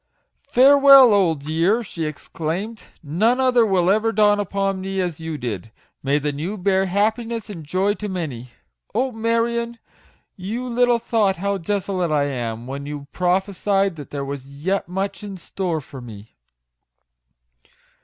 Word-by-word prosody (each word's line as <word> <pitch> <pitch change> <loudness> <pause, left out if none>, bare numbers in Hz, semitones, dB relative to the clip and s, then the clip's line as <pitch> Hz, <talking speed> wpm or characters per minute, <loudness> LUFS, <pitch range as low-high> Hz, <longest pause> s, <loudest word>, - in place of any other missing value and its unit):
"Farewell, 275 -2 +8
old 165 -8 +2
year!" 170 +9 +1
she 170 -6 -5
exclaimed; 165 +8 -5 0.2
" - - -42
none 215 - +1
other 255 -2 +4
will 185 -2 +3
ever 220 +2 +2
dawn 210 -2 +3
upon 195 -1 -1
me 195 0 -3
as 175 -4 -2
you 160 -1 -5
did. 115 -5 -5 0.3
May 140 +1 +1
the 150 0 -1
new 165 +9 -4
bear 190 0 +1
happiness 220 +3 -1
and 170 -5 -8
joy 185 +7 0
to 210 0 -6
many! 150 -10 -4 0.5
Oh, 255 +3 +1
Marion! 235 +1 -1 0.6
you 225 +7 -4
little 245 0 +3
thought 220 -4 +1
how 200 +2 -2
desolate 185 -1 -1
I 150 -2 +2
am, 120 -4 -3
when 140 +2 -6
you 145 -1 -7
prophe 185 +2 0
sied 195 -1 +1
that 145 - -9
there 140 -1 -4
was 140 +2 -8
yet 195 -2 0
much 195 +2 -3
in 200 -2 -7
store 175 -2 -3
for 135 -1 -11
me." 110 -3 -12
190 Hz, 155 wpm, -22 LUFS, 150-215 Hz, 0.6 s, Farewell